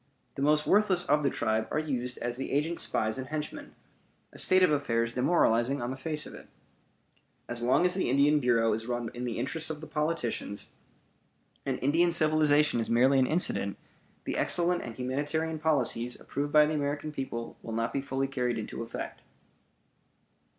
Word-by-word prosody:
The - - -6
most 150 +1 +3
worthless 195 -3 +3
of 150 +1 +3
the 145 - +2
tribe 110 0 -1
are - - -2
used 125 -5 -2
as 120 0 -3
the 135 - -4
agent's 155 +4 0
spies 110 +4 -1
and 130 - -5
henchmen; 155 +1 -6 0.6
a - - -6
state 185 0 +4
of 180 - +5
affairs 115 -5 0
demoralizing 125 -1 +2
on 120 +1 -3
the - - -4
face 150 +3 -2
of - - -10
it. - - -12 1.0
As 120 0 -4
long 125 +8 +3
as 180 - +4
the 185 - 0
Indian 145 +3 +4
Bureau 115 -4 +2
is 110 +2 -4
run 120 -2 -3
in 125 +1 -5
the 120 - -3
interests 155 +7 -2
of 155 -1 -4
the 155 - -8
politicians, 150 -11 -3 1.0
and 130 -2 0
Indian 165 +5 +3
civilization 155 -4 +3
is 115 - -2
merely 130 +4 +4
an 130 - +3
incident, 130 - +1 0.5
the - - -3
excellent 175 0 +1
and 115 -2 -7
humanitarian 145 +5 -2
policies 125 -6 0
approved 145 +1 -4
by 150 0 +6
the 155 - -1
American 145 +1 -2
people 130 -5 -5
will 115 - -7
not 115 +1 -1
be 140 - -1
fully 135 0 -2
carried 125 -3 -1
into 110 +1 -5
effect. 115 0 -6
135 Hz, 180 wpm, -29 LUFS, 120-155 Hz, 1.0 s, by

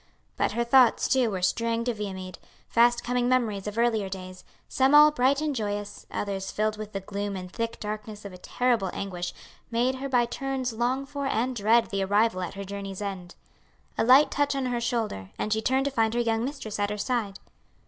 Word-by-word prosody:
But - - 0
her 235 - +1
thoughts, 250 0 +5
too, 255 -3 +3
were 190 -3 -4
straying 230 +5 +1
to 245 0 -1
Viamede; 190 -4 -6 0.3
fast 240 +1 +3
coming 245 0 0
memories 220 -6 0
of 210 +1 -5
earlier 225 -4 +1
days, 185 -1 -8 0.2
some 270 +2 +3
all 300 +1 +9
bright 275 +1 +2
and 300 -2 -1
joyous, 205 -2 -4
others 195 -1 -3
filled 215 0 0
with 215 -1 -7
the 195 - -3
gloom 200 +1 -4
and 180 -1 -7
thick 230 +2 -4
darkness 210 0 -6
of 200 - -7
a 180 - -11
terrible 240 -3 0
anguish, 180 -3 -4 0.4
made 245 +2 +1
her 275 +1 -4
by 245 -2 +3
turns 260 0 -3
long 250 +4 0
for 280 0 -4
and 255 0 0
dread 225 +2 +3
the 195 -1 0
arrival 205 0 +2
at 180 +1 -5
her 200 - -5
journey's 195 -1 -6
end. 190 -4 -6 0.6
A - - +1
light 260 +5 +6
touch 285 0 +1
on 270 -1 -1
her 245 -1 -1
shoulder, 225 - -2
and 215 - 0
she 220 - 0
turned 265 +4 +1
to 280 - 0
find 225 -2 +1
her - - +1
young 225 -1 +1
mistress 245 -6 -5
at 205 0 +1
her 210 - -3
side. 210 -3 -2
225 Hz, 210 wpm, -27 LUFS, 200-250 Hz, 0.6 s, all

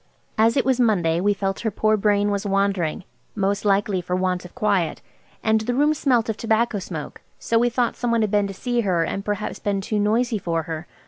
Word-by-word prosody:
As 225 +3 +3
it 270 - +2
was 260 -1 +2
Monday, 175 -8 +2
we 205 +2 +3
felt 195 -1 -2
her 225 - -1
poor 215 +1 +1
brain 205 0 +2
was 200 0 -1
wandering–most 195 +1 -2
likely 200 -2 +1
for 180 +1 -2
want 185 -1 -1
of 180 - -13
quiet. 205 -8 0 0.4
And 220 0 +2
the 245 +3 -2
room 295 +3 +3
smelt 255 -6 +1
of 220 -1 -2
tobacco 225 -1 +1
smoke, 165 -5 -7 0.2
so 230 - +1
we 240 +1 +3
thought 240 0 0
some 245 - -2
one 230 -1 +2
had 215 -2 0
been 205 -1 +2
to 195 - -6
see 240 +3 -1
her 180 -6 +1
and 195 - -3
perhaps 210 +1 -3
been 200 -1 -1
too 210 +2 -2
noisy 220 +2 +1
for 165 -3 -1
her. 160 +1 -6
205 Hz, 215 wpm, -23 LUFS, 195-230 Hz, 0.4 s, As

